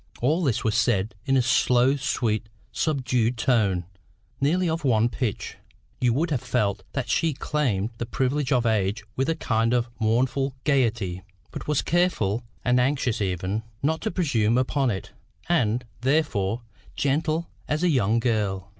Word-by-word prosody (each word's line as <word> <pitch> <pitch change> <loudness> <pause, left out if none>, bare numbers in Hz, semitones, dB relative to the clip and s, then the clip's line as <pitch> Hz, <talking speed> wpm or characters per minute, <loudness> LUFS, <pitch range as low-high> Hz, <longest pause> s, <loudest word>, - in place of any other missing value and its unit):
All 155 +9 +1
this 130 -8 0
was 110 - +1
said 105 -3 +1
in 135 0 +3
a 130 - +3
slow 125 +2 +3
sweet 115 -5 -1 0.2
subdued 125 -5 0
tone, 105 -8 +1 0.5
nearly 175 +6 +2
of 165 0 -1
one 115 -3 +3
pitch. 120 -3 -3 0.4
You 125 -1 +3
would 160 +6 0
have 130 -5 0
felt 105 -5 0
that 130 -4 -2
she 165 +4 +1
claimed 125 -8 -1
the 120 - -3
privilege 135 +3 -1
of 125 -3 +3
age 105 -1 +1
with 135 +4 0
a 165 - +1
kind 115 -5 +1
of 120 -1 0
mournful 130 +4 +1
gaiety, 115 - +1 0.3
but - - -7
was 150 -2 +1
careful, 125 - +1 0.2
and 125 0 +3
anxious 125 -3 +1
even, 95 +2 -1 0.2
not 160 +3 +1
to 220 - -1
presume 125 - +1
upon 130 +1 +1
it, 95 -5 -4 0.4
and, 125 -8 +1
therefore, 125 -6 0 0.3
gentle 155 +4 0 0.2
as 150 +3 -1
a 180 - +4
young 115 -6 +2
girl. 105 -5 -1
125 Hz, 155 wpm, -25 LUFS, 110-145 Hz, 0.5 s, a